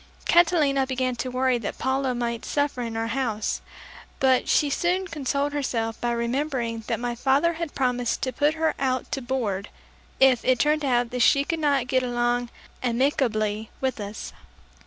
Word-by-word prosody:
Catalina 310 -6 +4
began 255 -1 -1
to 255 +2 -3
worry 255 -1 +1
that 205 - -5
Paula 265 -1 0
might 235 -1 -2
suffer 285 -3 -1
in 230 -2 -4
our 225 - -1
house, 225 -6 -1 0.6
but 260 -1 +3
she 295 - +4
soon 355 +6 0
consoled 285 -3 -1
herself 230 -6 -2
by 240 - 0
remembering 235 -1 -2
that - - -1
my 240 0 -2
father 275 +7 +2
had 330 -2 -5
promised 250 -3 0
to 255 - -1
put 295 +2 +2
her 320 0 +1
out 260 -1 -1
to 270 - -2
board, 230 -6 -2 0.5
if 265 -3 +5
it 255 -1 +3
turned 300 +4 +2
out 245 -3 +1
that 250 - -3
she 280 +4 +5
could 330 +3 -2
not 285 -4 +2
get 255 0 +1
along 240 -1 0 0.3
amicably 230 -4 0
with 260 -3 -1
us. 205 +1 -6
255 Hz, 170 wpm, -25 LUFS, 235-280 Hz, 0.6 s, if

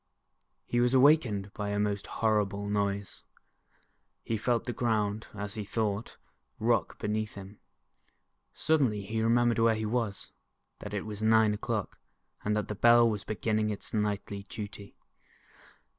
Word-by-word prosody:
He 120 - 0
was 125 +2 +3
awakened 125 -8 +4
by 105 -1 -3
a 100 - -1
most 105 -1 -1
horrible 105 -2 0
noise. 100 -1 -2 1.0
He 115 - -2
felt 115 +2 0
the 120 - -3
ground, 110 -3 0
as 105 0 -5
he 110 -2 -4
thought, 105 +1 -2 0.4
rock 115 -1 +1
beneath 105 0 -2
him. 100 +1 -10 0.9
Suddenly 130 -10 +1
he 110 +3 -3
remem 120 +2 +3
bered 115 - +1
where 115 -1 +4
he 110 0 -3
was, 110 -2 -2 0.5
that 105 0 -6
it 100 - -3
was 105 -1 -6
nine 110 -1 +4
o'clock, 105 -1 -3 0.4
and 105 +1 +1
that 105 - -2
the - - -3
Bell 120 +3 +6
was 105 -2 -2
beginning 110 0 -1
its 105 - -6
nightly 105 -1 -1
duty 105 -1 -8
105 Hz, 145 wpm, -30 LUFS, 105-115 Hz, 1.0 s, Bell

